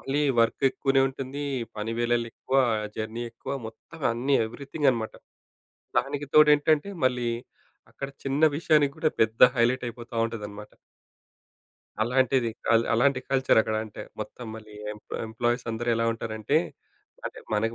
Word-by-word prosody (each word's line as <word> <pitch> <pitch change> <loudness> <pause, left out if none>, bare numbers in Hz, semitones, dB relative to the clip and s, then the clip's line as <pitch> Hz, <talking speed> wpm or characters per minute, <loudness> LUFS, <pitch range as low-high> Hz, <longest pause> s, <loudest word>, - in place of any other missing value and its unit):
మళ్ళీ 140 +2 -1 0.2
వర్క్ 115 +4 +1
ఎక్కువనే 135 0 +2
ఉంటుంది, 135 +2 -6 0.3
పని 110 +2 -3
వేళలు 120 0 +1
ఎక్కువ, 135 - -2 0.4
జర్నీ 110 +2 -4
ఎక్కువ, 115 - -7
మొత్తం 115 +9 -12
అన్నీ 130 +4 0
ఎవ్రీథింగన్నమాట. 135 -2 -1 0.9
దానికి 140 +3 -4
తోడేంటంటే 150 +3 +5 0.2
మళ్ళీ 125 -2 +1 0.6
అక్కడ 140 - -6 0.2
చిన్న 135 +3 0
విషయానికి 150 -3 +3
కూడా 155 -1 +1
పెద్ద 110 0 +1
హైలైట్ 120 +2 +2
అయిపోతా 120 0 -8
ఉంటదన్నమాట. 105 -2 -7 1.3
అలాంటిది 125 0 +2 0.2
అల్ 115 - +4
అలాంటి 125 +2 +3
కల్చర్ 130 -3 +4
అక్కడ 110 - -2
అంటే 110 - -9 0.2
మొత్తం 125 - -7
మళ్ళీ 110 -1 -11 0.2
ఎంప్ 105 - -11
ఎంప్లాయీస్ 120 +2 -1
అందరూ 120 +2 -3
ఎలా 115 0 +1
ఉంటారంటే 110 -2 0 0.7
అంటే - - -8 0.2
మనకు 115 +2 0
120 Hz, 130 wpm, -27 LUFS, 115-135 Hz, 1.3 s, తోడేంటంటే